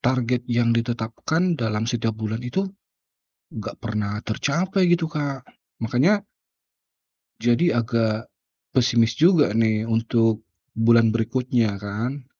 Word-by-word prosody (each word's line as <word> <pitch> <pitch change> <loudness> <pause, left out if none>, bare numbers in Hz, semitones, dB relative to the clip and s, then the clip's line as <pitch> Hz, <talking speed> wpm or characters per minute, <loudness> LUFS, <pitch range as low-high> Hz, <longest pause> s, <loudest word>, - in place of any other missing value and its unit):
target 125 -1 0
yang 120 -1 +2
ditetapkan 120 +9 -1
dalam 110 -1 -1
setiap 115 -2 -1
bulan 110 +1 -3
itu, 140 +11 -1 0.9
enggak 110 -2 -6
pernah 105 -2 -3
tercapai 180 - 0
gitu 170 -2 +2
Kak, 140 -4 -3 0.4
makanya 140 - +2 1.2
jadi 120 +9 +3
agak 115 -2 0 0.6
pesimis 120 -3 +3
juga 160 - +4
nih, 110 -1 +1
untuk 115 -1 +1 0.3
bulan 115 0 +4
berikutnya 115 -2 0
kan. 115 +7 -4
115 Hz, 105 wpm, -23 LUFS, 110-130 Hz, 1.2 s, juga